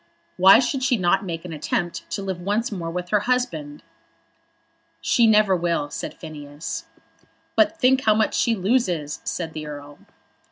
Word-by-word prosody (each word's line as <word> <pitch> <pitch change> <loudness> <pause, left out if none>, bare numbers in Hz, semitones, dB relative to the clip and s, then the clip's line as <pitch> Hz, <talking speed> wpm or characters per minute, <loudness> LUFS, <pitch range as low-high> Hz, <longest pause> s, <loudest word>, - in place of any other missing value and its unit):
"Why 190 +4 +8
should 260 +2 0
she 255 -2 +2
not 185 +1 +2
make 165 -1 -5
an 170 - -6
attempt 170 +3 -3
to 200 - -4
live 190 -2 -4
once 205 +6 -1
more 175 -5 -4
with 180 +1 -5
her 210 - +3
husband?" 160 -13 -1 1.2
"She 235 -2 +3
never 210 -3 +4
will," 170 -4 -1
said - - -5
Phineas. 155 - -7 0.7
"But 325 +1 +3
think 260 -2 +3
how 215 -1 +5
much 220 0 +1
she 230 - +2
loses," 185 - 0
said 165 -3 -4
the 155 -1 -6
Earl. 145 0 -9
180 Hz, 160 wpm, -23 LUFS, 160-225 Hz, 1.2 s, Why